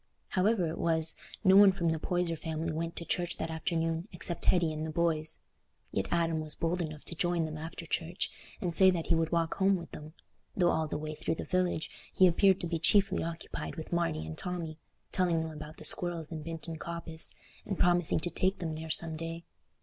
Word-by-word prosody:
However 195 0 +2
it 160 - -4
was, 160 -1 +4 0.3
no 190 -1 +6
one 200 0 +9
from 175 -3 0
the 160 -1 0
Poyser 175 0 -1
family 160 0 -3
went 165 +1 -3
to 170 - -6
church 175 0 0
that 160 - -3
afternoon 165 +2 -1
except 170 - +1
Hetty 170 -3 +3
and 155 0 -4
the 160 - -3
boys; 160 -1 0 0.5
yet 95 0 -1
Adam 165 -2 +1
was 155 -1 -2
bold 175 +2 -1
enough 155 -2 -5
to - - -5
join 175 0 +1
them 155 -1 -5
after 165 +1 -7
church, 165 +2 -2 0.3
and 175 -2 -2
say 190 +2 +7
that 175 -3 0
he - - +5
would 165 -1 +1
walk 165 -1 +1
home 195 0 +4
with 170 -2 -7
them, 150 +1 -9 0.4
though 175 -2 +4
all 160 0 0
the - - -3
way 155 0 -5
through 160 - -2
the - - -5
village 180 -3 0 0.2
he 185 - +6
appeared 190 +2 +4
to 175 - 0
be 165 -1 -2
chiefly 195 +3 +4
occupied 165 0 -5
with 160 0 -7
Marty 170 - 0
and 80 0 -6
Tommy, 170 -3 -4 0.3
telling 175 -3 +2
them 160 0 -4
about 155 0 -9
the - - -10
squirrels 170 -1 +1
in 160 -1 -5
Binton 165 0 -6
Coppice, 170 -1 0 0.3
and 195 - -4
promising 175 -3 +3
to 175 - -3
take 190 +1 +1
them 165 -3 -3
there 160 +1 -6
some 160 0 +1
day. 165 +1 -5
165 Hz, 215 wpm, -31 LUFS, 160-175 Hz, 0.5 s, one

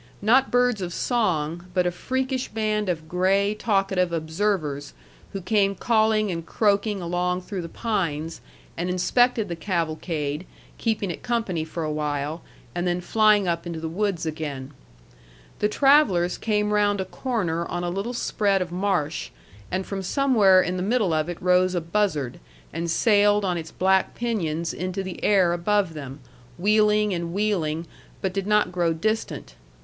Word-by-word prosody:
Not 255 +5 +4
birds 245 -4 +2
of 175 -1 -4
song, 175 - -1
but 180 -1 +3
a 175 - +1
freakish 260 +7 -2
band 215 -2 -1
of 160 -3 -3
gray 195 +4 +2
talkative 195 -4 +1
observers, 160 -3 -2 0.4
who 195 - -5
came 200 +1 +2
calling 220 -2 +2
and 165 -1 -4
croaking 205 +2 +1
along 180 +1 -1
through 190 0 -5
the 165 - -7
pines, 165 -9 -2 0.3
and 175 +2 -2
inspected 220 +5 +2
the 170 - -4
cavalcade, 160 -3 -2 0.3
keeping 215 -5 -1
it - - -7
company 225 -9 -1
for 160 +1 -5
a 155 - -2
while, 150 +1 -2 0.3
and 175 +1 -2
then 175 0 0
flying 210 +1 +3
up 170 0 -1
into 170 -2 -4
the 160 - -6
woods 185 0 -1
again. 150 -4 -4 0.9
The 210 - +2
travellers 220 - +4
came 210 -1 0
round 205 -1 +2
a 190 - -1
corner 180 -7 -2
on 175 0 -3
a 175 - -1
little 200 +7 -3
spread 200 -4 +1
of 180 -2 -3
marsh, 175 -5 -1 0.4
and 190 0 -2
from 195 -1 -4
somewhere 200 -4 +4
in 180 +1 -2
the - - -2
middle 205 -3 +1
of 155 +1 0
it 175 - -5
rose 180 0 +3
a - - +2
buzzard 165 -8 -1 0.3
and 170 +2 -3
sailed 205 +2 +3
on 180 -2 0
its 165 -1 -5
black 190 +2 +1
pinions 170 -9 -2
into 185 +2 -3
the 185 -1 -7
air 185 -4 +4
above 190 0 +1
them, 140 -2 -8 0.4
wheeling 210 +1 +3
and 170 -1 -3
wheeling, 175 -6 0 0.3
but 190 -1 -2
did 195 0 -2
not 210 -3 +3
grow 175 -2 +1
distant. 170 - -2
185 Hz, 165 wpm, -24 LUFS, 170-210 Hz, 0.9 s, Not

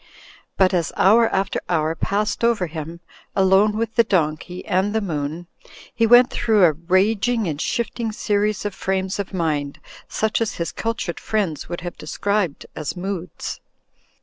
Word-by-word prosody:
But 190 0 +4
as 170 -2 0
hour 225 +4 +5
after 195 +1 -1
hour 160 -2 +1
passed 210 +7 -1
over 230 -5 +2
him, 165 +1 -7 0.3
alone 195 +2 +4
with 225 0 -2
the 230 +1 +5
donkey 175 -2 -1
and 190 +3 +1
the - - +3
moon, 160 -3 -3 0.5
he 230 -1 +2
went 245 +2 +7
through 215 -4 +2
a 170 - +7
raging 200 +8 +1
and 150 -1 -3
shifting 235 -1 -2
series 210 -1 0
of 205 - -2
frames 190 0 -2
of 200 - -3
mind, 150 -6 -2 0.3
such 220 +1 -1
as 225 -1 -1
his 170 -2 -3
cultured 225 -6 -3
friends 195 -9 -2
would 175 - -4
have 175 -1 -7
described 195 +1 -1
as 155 +3 -4
moods. 180 -2 -5
190 Hz, 155 wpm, -22 LUFS, 170-215 Hz, 0.5 s, went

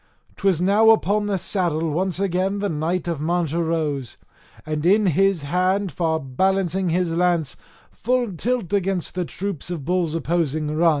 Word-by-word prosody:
'Twas 195 -5 +2
now 205 +5 +4
upon 210 -1 +3
the 200 -2 0
saddle 165 -4 -1
once 180 +3 -1
again 195 +1 0
the 205 0 -1
knight 165 +3 -2
of 165 -4 -2
Mancha 170 0 0
rose, 155 -6 -2 0.5
and 155 -1 -3
in 205 +5 +4
his 190 -1 +2
hand 185 +5 0
far 160 -2 0
balancing 185 +6 0
his 170 0 0
lance, 170 -4 +1 0.4
full 245 -2 -1
tilt 220 +1 -2
against 195 -3 0
the 180 -1 -2
troops 190 -2 -5
of 165 -6 -5
bulls 175 -2 0
opposing 155 -2 -1
run. 165 +2 +4
175 Hz, 160 wpm, -22 LUFS, 160-195 Hz, 0.5 s, now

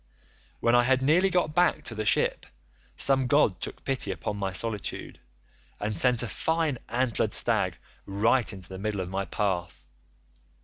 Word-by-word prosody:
"When 115 - +3
I 120 - +6
had 130 +1 +2
nearly 175 +7 +4
got 175 -4 0
back 175 +1 +2
to - - -4
the 110 -1 -4
ship - - +1 0.5
some 135 -2 +2
god 125 -8 +2
took - - -7
pity 135 -6 -1
upon 100 - -4
my 100 -1 -2
solitude, 105 +2 -2 0.6
and 105 +1 -2
sent 120 +6 +3
a - - -2
fine 160 -1 -1
antlered 120 -1 0
stag - - +2 0.3
right 110 +5 +2
into 95 -3 -10
the 95 +1 -8
middle 105 -1 -2
of 90 0 -6
my 95 +1 -2
path. 95 -5 -2
115 Hz, 165 wpm, -27 LUFS, 100-135 Hz, 0.6 s, I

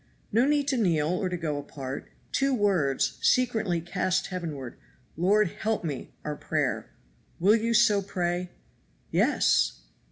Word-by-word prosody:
No 230 +4 +4
need 290 -1 +2
to 265 - +1
kneel 165 -8 +2
or 185 +1 0
to 180 - -3
go 155 -4 -2
apart. 135 -2 -7 0.2
Two 270 -1 +2
words 185 - +1
secretly 220 -8 +2
cast 185 +2 0
heavenward, 150 -8 -5 0.4
'Lord, 195 +4 +3
help 220 +4 -2
me,' 145 -5 -5
are 150 0 -2
prayer. - - -2 0.5
Will 200 +5 +5
you 230 +1 0
so 210 -3 +5
pray?" 180 -2 -2 0.6
"Yes!" - - +2
185 Hz, 135 wpm, -27 LUFS, 160-220 Hz, 0.6 s, Will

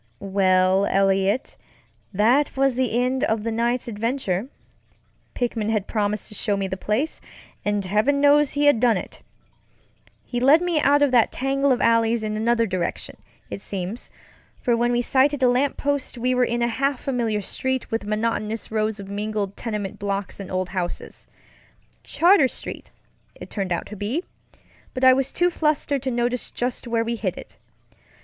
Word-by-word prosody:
Well, 190 0 +3
Eliot, 195 +4 +1 0.6
that 235 +9 +2
was 270 -1 +3
the 250 -2 0
end 255 +1 0
of 220 -1 -1
the 230 - -2
night's 235 +2 -1
adventure. 230 -2 -2 0.9
Pickman 230 -3 -1
had 215 -3 0
promised 210 -1 -2
to - - -9
show 205 0 -1
me 195 -1 -2
the 190 - -3
place, 215 +11 -2 0.4
and 205 -1 -1
heaven 215 +9 +2
knows 290 0 +5
he 290 0 +1
had 290 -6 +5
done 235 -2 +3
it. - - -8 1.0
He 245 - -3
led 275 +6 +6
me 350 -2 0
out 290 +1 +4
of 285 - +3
that 240 -3 +4
tangle 275 +1 0
of 250 - +1
alleys 230 0 +2
in 215 0 -2
another 230 +1 +2
direction, 185 -4 -3 0.4
it - - -5
seems, 195 +4 -5 0.5
for 240 - +1
when 240 +1 +1
we 240 0 +1
sighted 270 +2 +3
a - - +6
lamp 255 +3 +1
post 285 -3 -2
we 250 +2 0
were 250 0 +3
in 235 0 -1
a - - +2
half 275 +2 -1
familiar 230 -6 -1
street 260 +5 -3
with 225 - -1
monotonous 215 +1 -2
rows 215 -1 -1
of 200 - -8
mingled 205 0 -3
tenement 210 -4 -5
blocks 200 -1 -3
and 195 - -7
old 185 0 -2
houses. 180 -2 -5 0.8
Charter 345 -4 +4
Street, - - -5 0.5
it - - -11
turned 195 -3 -3
out 170 - -1
to 210 - -9
be, 215 - -2 0.7
but 255 - -3
I 260 0 +8
was 270 +1 0
too 355 0 +1
flustered 300 -4 0
to 265 - -2
notice 240 0 -1
just 245 0 -3
where 230 -1 0
we 235 +1 -3
hit 190 -5 -3
it. - - -11
230 Hz, 175 wpm, -23 LUFS, 205-260 Hz, 1.0 s, I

